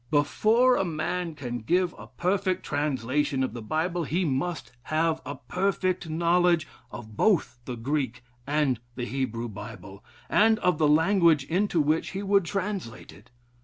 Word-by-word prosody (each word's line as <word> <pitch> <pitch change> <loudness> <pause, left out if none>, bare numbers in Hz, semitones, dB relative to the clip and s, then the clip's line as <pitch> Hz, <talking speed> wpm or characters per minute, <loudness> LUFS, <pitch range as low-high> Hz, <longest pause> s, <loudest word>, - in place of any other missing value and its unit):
Before 220 - +3
a - - +1
man 170 0 -3
can 120 -4 -5
give 175 +9 +1
a - - -11
perfect 185 0 -1
translation 145 -1 0
of 130 - -2
the 120 - -6
Bible, 165 +9 -1
he 170 +5 0
must 155 +4 -2
have 160 +1 0
a 140 - -4
perfect 185 +5 -1
knowledge 170 0 +2 0.2
of 110 -2 -9
both 175 - +2
the 125 - -4
Greek 130 0 -2 0.2
and 145 -4 +1 0.2
Hebrew 120 -2 -3
Bible, 100 -2 -10 0.2
and 220 +1 +4
of 180 -7 +1
the 155 - +4
language 160 -1 +4
into 180 +3 0
which 155 +2 +1
he 195 +1 -3
would 200 -2 +3
translate 190 - -4
it. - - -18
155 Hz, 150 wpm, -27 LUFS, 130-180 Hz, 0.2 s, and